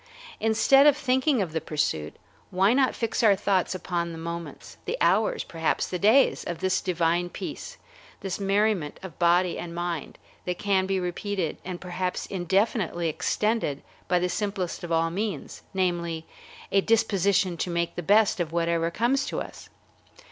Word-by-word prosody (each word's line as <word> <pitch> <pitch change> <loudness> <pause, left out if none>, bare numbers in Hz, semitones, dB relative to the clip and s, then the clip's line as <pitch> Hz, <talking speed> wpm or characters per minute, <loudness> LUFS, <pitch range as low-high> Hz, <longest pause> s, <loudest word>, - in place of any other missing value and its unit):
Instead 225 +6 +5
of 290 -1 +5
thinking 260 -3 +2
of 170 - -6
the 160 - -1
pursuit, 80 - -2 0.3
why 195 +4 +3
not 265 0 +2
fix 230 +1 -1
our 210 -4 +6
thoughts 190 -1 0
upon 170 -2 -2
the - - -7
moments, 170 +1 -7
the - - -2
hours, - - +2
perhaps 165 -1 -1
the 180 - -4
days, 225 +8 +4
of 175 - -4
this 190 +2 0
divine 175 -1 0
peace, - - -7 0.4
this 195 -1 -4
merriment 200 -5 +1
of 185 -5 -9
body 175 0 +3
and 170 -1 -6
mind, 175 -2 -4 0.3
that 180 -1 -2
can 195 -2 +1
be 195 -1 0
repeated 180 -1 -3
and 180 -1 -5
perhaps 180 0 -3
indefinitely 190 -2 0
extended 210 -3 -1 0.2
by 180 - +3
the 180 +1 +1
simplest 195 -2 -3
of 170 - -5
all 165 0 +2
means, 200 -3 -4
namely, 170 -4 -1 0.5
a 195 - +4
disposition 200 -4 +2
to 175 - -3
make 170 0 -1
the - - -3
best 205 +4 +3
of 165 -2 -2
whatever 170 0 +1
comes 245 +10 +1
to - - -2
us? - - -9
185 Hz, 160 wpm, -26 LUFS, 170-205 Hz, 0.5 s, our